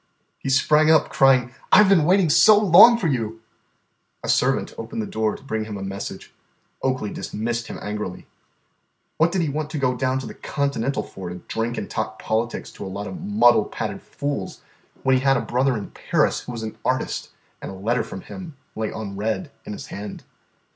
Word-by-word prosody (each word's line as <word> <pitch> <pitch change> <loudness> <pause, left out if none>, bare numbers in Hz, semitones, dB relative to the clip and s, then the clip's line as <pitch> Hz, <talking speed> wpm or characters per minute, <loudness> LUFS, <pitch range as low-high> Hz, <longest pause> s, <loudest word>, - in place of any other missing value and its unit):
He - - -4
sprang 150 +3 +4
up, 160 -2 +5
crying, 130 -2 +4 0.2
"I 210 - +8
've 195 - +2
been 175 -6 +5
waiting 185 +1 +4
so 210 +7 +7
long 210 +4 +8
for 225 - -3
you!" 115 -7 -1 0.8
A - - -4
servant - - +2
opened 115 0 -6
the 110 - -1
door 110 0 -1
to - - -13
bring 110 -5 -3
him 105 -2 -6
a 95 - -6
message. 95 0 -6 0.5
Oakley 130 -6 -1
dismissed 115 +2 -3
him - - -6
angrily. 105 -3 -5 0.9
What 165 +2 +3
did 185 -2 +1
he 155 - -1
want 150 +1 -3
to 155 - -4
go 130 -3 +1
down 130 +1 0
to 130 - -4
the - - -7
Continental 140 -2 -2
for 95 -2 -8
to 90 - -6
drink 115 +2 -2
and - - -3
talk 110 0 -3
politics 115 +2 -2
to - - -9
a 95 - -5
lot 100 +2 -5
of 180 - -7
muddle 195 - +4
pated - - -5
fools 140 -10 -4 0.4
when 130 -1 +4
he - - -1
had 135 -1 +3
a - - -1
brother 125 0 +1
in 105 - -7
Paris - - +1
who - - -8
was 115 -2 -5
an 110 - -6
artist - - -1 0.3
and - - -6
a 95 - -7
letter 115 +5 0
from 95 - -8
him 175 - -9 0.2
lay 110 0 -2
unread 110 - -4
in - - -5
his - - -7
hand? 100 0 -7
125 Hz, 200 wpm, -23 LUFS, 110-150 Hz, 0.9 s, I